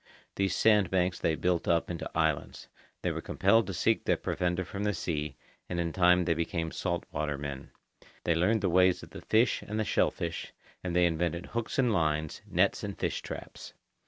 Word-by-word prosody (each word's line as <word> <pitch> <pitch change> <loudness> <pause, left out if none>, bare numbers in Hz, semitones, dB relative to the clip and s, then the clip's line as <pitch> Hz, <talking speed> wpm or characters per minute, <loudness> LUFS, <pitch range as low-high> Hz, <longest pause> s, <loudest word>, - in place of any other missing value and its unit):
These 100 -1 0
sand 105 -5 +4
banks 90 -1 +1
they 80 - +1
built 90 0 0
up 85 0 +2
into 85 - -4
islands. 80 -2 -1 0.4
They - - +1
were - - -4
compelled 100 +2 +3
to 95 - -3
seek 110 +4 +2
their - - +2
provender 90 0 -1
from 100 +3 -5
the 105 -1 0
sea, 75 -4 -3 0.3
and 85 - -2
in 85 -1 -1
time 90 -1 +4
they 85 - +3
became 80 0 -2
salt 85 -2 -2
water 75 -2 -2
men. 70 -1 -6 0.5
They 85 - +2
learned 95 +7 +2
the 100 - +1
ways 90 +1 +4
of - - -12
the - - -9
fish 110 0 +2
and 105 +1 -4
the 110 - 0
shellfish, - - -1 0.3
and 90 -2 -3
they 90 0 +5
invented 85 +1 -1
hooks 115 -1 -4
and 125 -4 +3
lines, 80 -4 0
nets - - +2
and - - -4
fish - - -2
traps. - - -8
90 Hz, 195 wpm, -30 LUFS, 80-100 Hz, 0.5 s, they